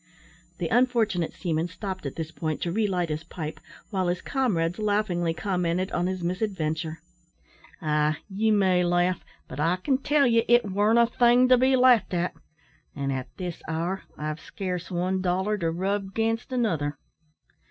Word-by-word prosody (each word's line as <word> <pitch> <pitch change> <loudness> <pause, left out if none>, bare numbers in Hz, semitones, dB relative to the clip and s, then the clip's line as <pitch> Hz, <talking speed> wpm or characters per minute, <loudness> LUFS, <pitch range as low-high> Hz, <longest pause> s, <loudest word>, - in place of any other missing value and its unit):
The - - -2
unfortunate 230 -9 +2
seaman 165 -2 -2
stopped 185 -2 -5
at 135 - -6
this 160 -1 -5
point 155 -2 -3
to 170 - -1
relight 185 -4 0
his 155 +1 -3
pipe, 160 -2 -6 0.3
while 190 -3 0
his 175 0 0
comrades 185 -10 0
laughingly 205 -5 +1
commented 180 +1 -1
on 175 +1 0
his 185 -1 -3
misadventure. 170 -4 -2 0.9
"Ah! 150 0 +1
ye 210 +2 0
may 190 -4 +3
laugh; 175 +1 +1 0.2
but 130 - -8
I 165 +4 +2
can 260 +8 0
tell 290 0 +3
ye 230 -2 +4
it 240 0 +5
warn't 205 +3 +2
a 235 - +6
thing 245 +1 +4
to 255 - +7
be 260 +1 +4
laughed 250 -6 +4
at; 175 +1 0 0.6
an' 140 -1 -2
at 130 -1 -3
this 180 -3 -5
hour 170 +4 -2 0.2
I've 155 +1 -4
scarce 180 -3 -5
one 185 +1 -1
dollar 190 +3 0
to 165 -2 0
rub 195 +3 -2
'gainst 225 +2 -1
another." 165 - 0
185 Hz, 165 wpm, -26 LUFS, 165-215 Hz, 0.9 s, to